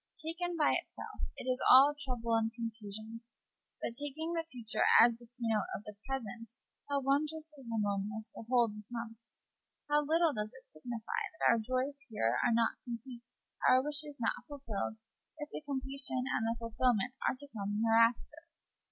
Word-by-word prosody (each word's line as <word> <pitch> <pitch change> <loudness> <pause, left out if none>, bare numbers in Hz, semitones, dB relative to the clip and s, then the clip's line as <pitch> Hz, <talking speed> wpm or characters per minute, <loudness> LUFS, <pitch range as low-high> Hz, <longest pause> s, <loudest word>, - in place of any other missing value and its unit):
Taken 340 +2 -3
by 300 - +4
itself, - - -4
it - - -6
is 255 0 0
all 275 +3 +9
trouble 250 -5 -3
and 225 0 +2
confusion; 225 -1 -6 0.6
but, - - -2
taking 290 +5 -4
the 330 -1 0
future 235 -3 -3 0.2
as 235 +1 +8
the 240 - -15
key 245 +1 -24
note 220 -3 +1
of 200 - -6
the 210 - -8
present, 235 -3 -5 0.3
how 280 -1 +1
wondrously 300 +2 -1
harmonious 210 0 -2
the - - -8
whole 245 -2 +5
becomes! 225 +2 -8 0.4
How 295 0 +4
little 320 +1 +3
does 210 -1 -2
it 260 - -13
signify 230 - -5 0.2
that - - +4
our - - +5
hearts 255 +5 -1 0.2
are 120 - +2
not 230 0 +2
complete, 240 0 -7 0.5
our 255 0 +6
wishes 295 0 0
not 230 - -1
fulfilled, 230 -7 -4 0.4
if 295 -1 -6
the - - -5
completion 270 -2 0
and 225 - +1
the 230 - -1
fulfilment 230 0 +1 0.2
are - - -1
to 285 - -9
come 205 0 -2
hereafter! 230 +8 +3
245 Hz, 160 wpm, -33 LUFS, 225-285 Hz, 0.6 s, all